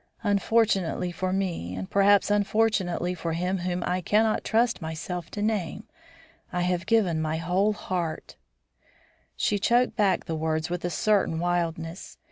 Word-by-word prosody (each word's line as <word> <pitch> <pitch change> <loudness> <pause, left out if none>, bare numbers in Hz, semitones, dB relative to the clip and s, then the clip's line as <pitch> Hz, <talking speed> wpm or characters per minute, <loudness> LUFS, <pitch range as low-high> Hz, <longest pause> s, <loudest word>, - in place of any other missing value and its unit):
Unfortunately 200 -4 +1
for 185 +1 -2
me, 175 - -2
and 95 0 -5
perhaps 200 0 +4
unfortunately 205 -4 +1
for 165 -1 -3
him 180 +3 -1
whom 175 0 -2
I 180 +1 -1
cannot 215 +4 +2
trust 235 -1 +1
myself 165 +2 -5
to 205 - -4
name, 210 -2 -1 0.7
I 180 - -1
have 180 0 -1
given 200 -8 +2
my 155 0 -1
whole 180 +6 +1
heart 175 -6 -4 0.5
" - - -32 0.3
She 205 - 0
choked 240 +5 +2
back 205 -5 +2
the 165 - -3
words 160 +1 -1
with 175 0 -3
a 175 - 0
certain 200 -2 +1
wildness. 170 0 -2
180 Hz, 150 wpm, -26 LUFS, 170-205 Hz, 0.7 s, perhaps